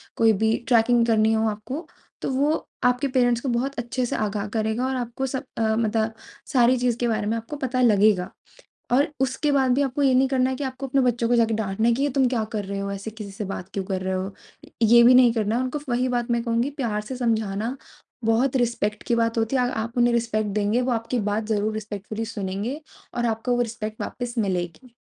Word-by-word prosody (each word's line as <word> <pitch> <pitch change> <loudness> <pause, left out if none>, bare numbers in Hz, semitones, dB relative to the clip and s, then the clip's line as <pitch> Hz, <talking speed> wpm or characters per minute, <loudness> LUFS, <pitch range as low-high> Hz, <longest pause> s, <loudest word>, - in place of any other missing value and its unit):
कोई 225 -1 +4
भी 220 +2 +2
ट्रैकिंग 235 0 +4
करनी 220 -1 +3
हो 220 0 +2
आपको 255 +10 -6 0.3
तो - - -2
वो 285 +4 +2 0.3
आपके 250 +3 +2
पेरेंट्स 245 -3 +2
को 270 - -2
बहुत 255 +3 -1
अच्छे 245 +2 -2
से - - -3
आगाह 210 -1 -2
करेगा 220 +3 0
और 265 - -1
आपको 245 +1 -3
सब 265 +1 -3
अ, 220 -1 +1
मत 225 0 0 0.6
सारी 250 0 +5
चीज़ 245 -1 0
के 240 - +1
बारे 220 -2 -1
में 225 +2 0
आपको 230 +6 -6
पता 255 -2 -1
लगेगा। 205 -5 +4 0.6
और 275 +4 +4
उसके 265 +3 0
बाद 265 -2 +3
भी 280 - +2
आपको 275 +1 -1
ये 265 -2 +4
नहीं 265 +1 +4
करना 260 -1 +2
है 260 - -2
कि 285 - -4
आपको 265 +1 -4
अपने 270 +1 +1
बच्चों 240 -2 +1
को 245 - +3
जाके 225 -1 +3
डाँटना 215 +1 0
है - - +4
कि, 265 - -1
"ये 290 - +2
तुम 265 0 +3
क्या 240 -3 0
कर 210 -2 -2
रहे 200 +1 -4
हो? 200 0 -3
ऐसे 200 +2 -5
किसी 215 -2 -8
से 200 +2 -6
बात 190 -1 -6
क्यों 195 - -2
कर 185 -1 -3
रहे 190 0 -1
हो?" 190 +2 -3 0.5
ये 235 +2 +7
भी 245 +2 +7
नहीं 250 -2 +7
करना 220 -1 0
है 250 - +1
उनको 260 +3 -3
वही 250 +1 +1
बात 240 -1 -1
मैं 235 0 +1
कहूँगी 235 +3 0
प्यार 215 -5 -1
से 255 +5 -6
समझाना 225 -1 -1 0.5
बहुत 240 +4 +2
रिस्पेक्ट 230 -4 0
की 240 - 0
बात 230 0 +1
होती 225 +4 +1
है। 255 - +3
आ - - +2 0.2
आप 230 +2 -7
उन्हें 240 0 +4
रिस्पेक्ट 215 -3 0
देंगे 210 +4 +1
वो 250 0 0
आपकी 230 +2 -1
बात 215 +1 -1
ज़रूर 215 0 0
रिस्पेक्टफुली 215 +1 -5
सुनेंगे 215 +5 -4 0.3
और 240 0 0
आपको 225 +2 0
वो - - 0
रिस्पेक्ट 220 -2 -5
वापिस 245 -1 -5
मिलेगी। 190 +4 -3
230 Hz, 230 wpm, -24 LUFS, 215-255 Hz, 0.6 s, ये